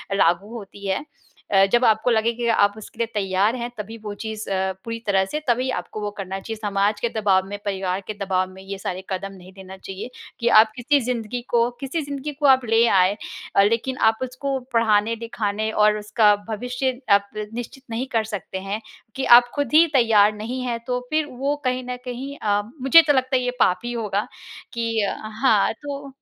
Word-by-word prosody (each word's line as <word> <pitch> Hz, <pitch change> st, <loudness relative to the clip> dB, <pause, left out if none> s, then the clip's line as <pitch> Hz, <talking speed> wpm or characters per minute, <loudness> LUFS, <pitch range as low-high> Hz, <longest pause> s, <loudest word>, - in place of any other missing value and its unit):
लागू 195 Hz, +4 st, +2 dB
होती 200 Hz, -1 st, -9 dB
है। 195 Hz, +10 st, -1 dB, 0.5 s
अ, 195 Hz, 0 st, +6 dB
जब 240 Hz, +1 st, +4 dB
आपको 220 Hz, +1 st, +3 dB
लगे 225 Hz, 0 st, +2 dB
कि 235 Hz, 0 st, -3 dB
आप 205 Hz, -3 st, +3 dB
उसके 220 Hz, -, -12 dB
लिए 230 Hz, -, +1 dB
तैयार 200 Hz, +2 st, +1 dB
हैं 240 Hz, -1 st, -4 dB
तभी 220 Hz, +2 st, -7 dB
वो 210 Hz, -1 st, -5 dB
चीज़ 220 Hz, -1 st, -5 dB
अ, 190 Hz, 0 st, 0 dB
पूरी 230 Hz, 0 st, -4 dB
तरह 195 Hz, -1 st, +3 dB
से 300 Hz, -, -1 dB
तभी 250 Hz, +2 st, +1 dB
आपको 180 Hz, +4 st, -8 dB
वो 205 Hz, 0 st, -3 dB
करना 195 Hz, -1 st, -4 dB
चाहिए। 225 Hz, +3 st, -6 dB
समाज 205 Hz, 0 st, 0 dB
के 235 Hz, -, +1 dB
दबाव 195 Hz, -3 st, +2 dB
में, 205 Hz, +1 st, -5 dB
परिवार 190 Hz, -1 st, -2 dB
के 215 Hz, -, -3 dB
दबाव 185 Hz, -2 st, 0 dB
में 190 Hz, 0 st, -13 dB
ये 195 Hz, 0 st, -6 dB
सारे 190 Hz, -1 st, -5 dB
कदम 195 Hz, +1 st, -4 dB
नहीं 185 Hz, -1 st, -14 dB
लेना 190 Hz, 0 st, -10 dB
चाहिए 195 Hz, +4 st, -7 dB, 0.3 s
कि 235 Hz, -, -1 dB
आप 220 Hz, 0 st, +5 dB
किसी 275 Hz, +3 st, +2 dB
ज़िंदगी 245 Hz, -1 st, -3 dB
को 235 Hz, 0 st, +3 dB
किसी 275 Hz, +4 st, -2 dB
ज़िंदगी 285 Hz, 0 st, -5 dB
को 295 Hz, -, 0 dB
आप 260 Hz, -2 st, +5 dB
ले 225 Hz, +1 st, +5 dB
आए 190 Hz, 0 st, +3 dB, 0.4 s
अ, 200 Hz, -, +6 dB
लेकिन 230 Hz, +5 st, 0 dB
आप 220 Hz, -, -16 dB
उसको 265 Hz, +2 st, -3 dB
पढ़ाने, 225 Hz, -1 st, +3 dB
लिखाने 220 Hz, -2 st, -3 dB
और 210 Hz, -1 st, +3 dB
उसका 210 Hz, 0 st, +3 dB
भविष्य 250 Hz, +3 st, -2 dB
आप 200 Hz, 0 st, +4 dB, 0.2 s
निश्चित 245 Hz, +3 st, -7 dB
नहीं 240 Hz, +4 st, -2 dB
कर 225 Hz, -1 st, +2 dB
सकते 190 Hz, -1 st, -5 dB
हैं 210 Hz, +2 st, -2 dB, 0.3 s
कि 265 Hz, -, -2 dB
आप 245 Hz, 0 st, -9 dB
खुद 285 Hz, -3 st, -2 dB
ही 320 Hz, +2 st, +8 dB
तैयार 220 Hz, -5 st, +5 dB
नहीं 240 Hz, +5 st, -4 dB
हैं। 235 Hz, -2 st, -2 dB
तो 250 Hz, 0 st, 0 dB
फ़िर 310 Hz, 0 st, +1 dB
वो 275 Hz, +3 st, -1 dB
कहीं 255 Hz, 0 st, 0 dB
न 250 Hz, -, -3 dB
कहीं 260 Hz, +3 st, -5 dB
अ, 205 Hz, -1 st, +1 dB, 0.2 s
मुझे 270 Hz, +6 st, +8 dB
तो 290 Hz, -, +5 dB
लगता 260 Hz, 0 st, +1 dB
है 250 Hz, -, -1 dB
ये 250 Hz, -, 0 dB
पाप 180 Hz, -4 st, +3 dB
ही 240 Hz, -, -3 dB
होगा 210 Hz, -3 st, -2 dB, 0.5 s
कि 230 Hz, -1 st, -2 dB
अ, 200 Hz, -, 0 dB, 0.3 s
हाँ 215 Hz, -7 st, +4 dB
तो 285 Hz, -1 st, -6 dB
220 Hz, 210 wpm, -23 LUFS, 200-250 Hz, 0.5 s, ही